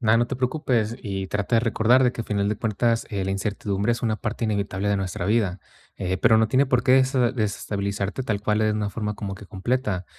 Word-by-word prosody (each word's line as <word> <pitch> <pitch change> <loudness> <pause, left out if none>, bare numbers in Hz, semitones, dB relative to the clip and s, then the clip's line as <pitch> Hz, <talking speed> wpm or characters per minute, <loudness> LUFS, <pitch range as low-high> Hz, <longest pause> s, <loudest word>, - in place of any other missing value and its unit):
Na, 110 -2 +4
no 120 +1 +2
te - - -4
preocupes, 125 -4 0
y 95 -4 -4
trata 105 +4 -1
de - - +4
recordar 115 +2 +3
de 125 - +4
que, 115 - -5
al - - -12
final 100 -1 0
de 105 - -1
cuentas, 115 +2 0
eh, 100 -3 -2
la 95 - -2
incertidumbre 100 +1 -1
es 120 - -4
una 110 -2 0
parte 115 +1 -3
inevitable 100 -2 -1
de 100 - +2
nuestra 95 -1 -3
vida, 100 -3 +1 0.4
eh, 95 0 -2
pero 110 +3 +5
no 110 0 +3
tiene 130 +5 +3
por 125 -1 +2
qué 130 - +3
dese 130 +1 +4
desestabilizarte 100 -1 -2
tal 105 -4 -2
cual 105 0 +1
de 110 0 +2
una 105 -1 -2
forma 105 +1 -3
como 100 -1 -5
que 100 - -12
completa. 100 -1 -2
105 Hz, 235 wpm, -24 LUFS, 100-120 Hz, 0.4 s, pero